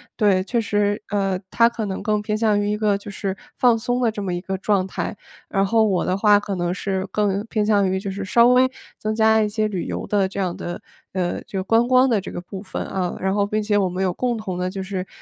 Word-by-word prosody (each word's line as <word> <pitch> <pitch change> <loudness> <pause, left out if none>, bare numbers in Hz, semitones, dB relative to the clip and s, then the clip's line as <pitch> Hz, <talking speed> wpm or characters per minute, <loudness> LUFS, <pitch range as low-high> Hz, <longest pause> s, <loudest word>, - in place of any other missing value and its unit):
对， 195 -3 +3
确 235 +4 0
实， 205 -1 0
呃， 195 -2 0
它 230 - +4
可 235 -2 -3
能 190 -1 -4
更 210 -1 +1
偏 210 0 -2
向 215 -2 +2
于 205 - -1
一 210 - 0
个 210 -1 +2
就 200 - -10
是 195 -1 -3 0.2
放 245 -3 +4
松 245 +2 -1
的 230 -3 +2
这 210 - -5
么 190 -3 -2
一 175 - -3
个 190 +1 -3
状 195 -1 +1
态， 195 +2 -4 0.3
然 195 0 +1
后 225 +3 +3
我 190 -4 +1
的 185 - +1
话 205 +1 +5
可 205 -1 -5
能 175 -1 -1
是 190 0 -2
更 205 -1 0
偏 215 -2 0
向 205 -3 +3
于 190 0 0
就 195 -1 -4
是 200 +1 -5
稍 235 +5 +5
微 255 +1 +5 0.3
增 215 0 -2
加 220 0 +4
一 210 - +1
些 215 0 0
旅 190 -5 -3
游 - - -4
的 200 -2 +1
这 195 - -10
样 180 -3 -1
的 175 - -6 0.3
呃， 180 -2 -1
这 195 - -5
个 190 - -1
观 225 +4 +3
光 255 +1 +5
的 225 -4 +3
这 195 - -7
个 - - -5
部 190 +1 -8
分， 190 - -5
啊， 180 -2 -2
然 190 +1 0
后 200 0 +1
并 215 +1 -1
且 205 0 +1
我 195 -2 +2
们 180 +2 -2
有 185 -2 +1
共 240 +3 -1
同 190 -5 -4
的 180 0 -1
就 190 0 -5
是 190 -1 -4
205 Hz, 290 characters per minute, -22 LUFS, 190-215 Hz, 0.3 s, 话